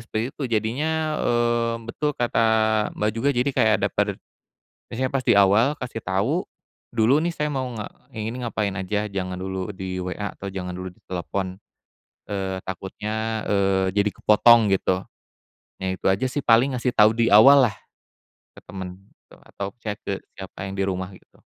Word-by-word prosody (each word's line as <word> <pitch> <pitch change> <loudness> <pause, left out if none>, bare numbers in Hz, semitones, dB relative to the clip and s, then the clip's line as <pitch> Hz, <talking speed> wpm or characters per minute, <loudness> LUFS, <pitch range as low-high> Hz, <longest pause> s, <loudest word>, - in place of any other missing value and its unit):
seperti 110 +1 -2
itu 145 - -8
jadinya, 150 +8 -1
eee, 120 -1 +1 0.2
betul 150 +3 -2
kata, 115 -1 +2 0.5
Mbak, 105 +1 +1
juga 115 +6 0
jadi 125 +3 +1
kayak 110 -4 +3
ada - - +2
per - - 0 0.8
misalnya 130 +2 -2
pas 135 - +1
di - - +6
awal 105 +9 +4
kasih 125 -2 -5
tahu, 105 - -1 0.5
dulu 120 +6 +4
nih 170 - 0
saya 150 - -1
mau 130 -2 -2
nge 105 - -4 0.3
ini 110 +3 -4
ngapain 105 -3 -1
aja 105 +3 -1
jangan 95 -2 -3
dulu 95 0 -4
di 95 0 -4
WA 95 +3 -4
atau 100 - -8
jangan 90 -2 -5
dulu 90 +1 -6
ditelepon, 95 +1 -5 0.7
eee, 95 -2 -3
takutnya, 110 +4 -4
eee, 95 -2 +2
jadi 105 +1 +3
kepotong 110 0 +5
gitu. 95 0 0 0.8
Nah, 95 - -3
itu - - -15
aja 100 +7 0
sih 140 +2 -3
paling 120 +4 +4
ngasih 125 0 0
tahu 110 -2 +5
di 115 -3 +2
awal 135 +7 +8
lah - - -14 0.8
ke - - -9
temen 95 -1 -7 0.3
atau 100 0 -8
chat 105 -3 -4
ke 100 - -3 0.2
siapa 95 0 -8
yang 95 - -5
di - - +2
rumah 95 0 -3
gitu. - - -19
105 Hz, 165 wpm, -24 LUFS, 95-120 Hz, 0.8 s, awal